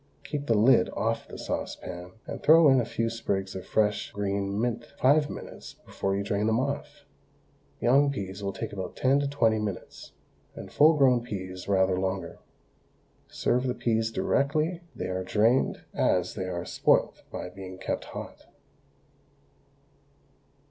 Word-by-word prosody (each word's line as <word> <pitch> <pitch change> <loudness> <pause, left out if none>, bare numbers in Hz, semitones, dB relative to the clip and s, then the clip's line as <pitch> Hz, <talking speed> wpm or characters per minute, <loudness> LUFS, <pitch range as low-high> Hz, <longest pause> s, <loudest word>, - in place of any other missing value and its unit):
Keep 145 0 -4
the 115 - +3
lid 115 -2 +5
off - - -1
the - - -9
saucepan 90 +1 -5
and - - -6
throw 160 0 +7
in 130 -2 +5
a - - -2
few 115 0 -2
sprigs 100 -4 -2
of 95 - -7
fresh 105 -1 +1
green 100 0 -2
mint 120 0 -1
five 145 +3 +4
minutes - - -9
before 95 0 -2
you 100 - -1
drain 105 +1 0
them 110 +1 +2
off. 140 +2 -4 0.7
Young 140 +4 +4
peas 100 -5 -5
will 100 -1 -2
take 95 - -6
about 95 -3 -5
ten 135 +2 +3
to 145 - 0
twenty 115 -6 +2
minutes, 105 -3 -6 0.4
and - - -9
full 155 +2 +6
grown 130 -4 +4
peas 95 -6 -6
rather 95 -2 +2
longer. 95 0 -3 0.9
Serve 125 +2 0
the 125 - -1
peas 110 -1 0
directly 155 +8 0
they - - -4
are 95 0 -2
drained, 110 +7 +2
as 90 0 +1
they 95 - -4
are 85 -1 -4
spoilt - - +2
by - - -5
being 95 0 -9
kept - - -3
hot. - - -9
110 Hz, 155 wpm, -27 LUFS, 95-130 Hz, 0.9 s, throw